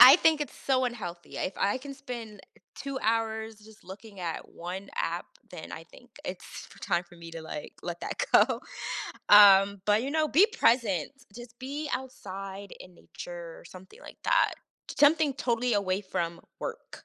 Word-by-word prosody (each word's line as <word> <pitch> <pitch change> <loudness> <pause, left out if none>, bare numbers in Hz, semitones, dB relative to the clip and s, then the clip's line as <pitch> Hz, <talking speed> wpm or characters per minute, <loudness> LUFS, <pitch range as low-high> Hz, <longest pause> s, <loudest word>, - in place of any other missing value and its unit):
I 255 +3 +12
think 320 -3 +4
it's 295 - -3
so 260 -1 +1
unhealthy. 185 -8 -5
If 190 - -2
I 200 +4 +2
can 275 +2 -7
spend 240 -6 -8 0.4
2 275 -1 -4
hours 220 0 0
just 215 0 -17
looking 200 +1 -11
at 170 -2 -4
1 185 +3 -7
app, - - -2 0.2
then - - -8
I - - -6
think - - -19
it's - - -5
for - - -11
time 175 - 0
for 175 0 -18
me 170 -1 -10
to, 165 -1 -7
like, 150 -2 -7
let 175 -1 -4
that - - -2
go. - - +5 0.7
Um, 200 -1 +8
but, 210 +3 +3
you 275 - -3
know, 310 -1 +2
be 355 +10 +6
present. 230 - +2 0.2
Just 240 0 -11
be 285 +3 -4
outside 195 -6 -6
in 180 - -13
nature 170 -1 -9
or - - -15
something 185 +2 -13
like - - -13
that. - - +3 0.4
Something 295 -1 +5
totally 245 -2 0
away 195 -1 +1
from 170 -3 -3 0.2
work. - - -7
215 Hz, 175 wpm, -29 LUFS, 185-260 Hz, 0.7 s, I